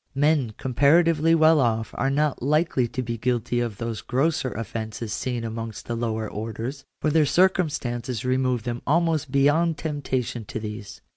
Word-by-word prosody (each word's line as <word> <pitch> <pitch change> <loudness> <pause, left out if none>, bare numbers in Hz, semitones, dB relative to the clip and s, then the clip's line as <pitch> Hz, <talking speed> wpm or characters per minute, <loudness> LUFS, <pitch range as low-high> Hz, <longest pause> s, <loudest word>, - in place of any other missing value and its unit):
Men 140 -6 +2
comparatively 160 +5 +3
well 160 -1 +5
off 115 -3 0
are 135 - 0
not 145 +1 0
likely 145 -2 +2
to 130 +2 -4
be 115 -1 -4
guilty 120 0 0
of 115 -4 -2
those 115 -2 -4
grosser 135 +4 0
offences 110 0 -5
seen 125 -2 -3
amongst 115 -1 -5
the 120 - -3
lower 110 -2 -2
orders, 115 +6 -5 0.2
for 155 - +1
their 155 -1 +4
circumstances 135 - +1
remove 130 -2 +1
them 120 0 -4
almost 155 -2 +1
beyond 150 +4 +3
temptation 130 -6 -3
to 110 - -5
these. 105 -1 -7
130 Hz, 155 wpm, -24 LUFS, 115-150 Hz, 0.2 s, well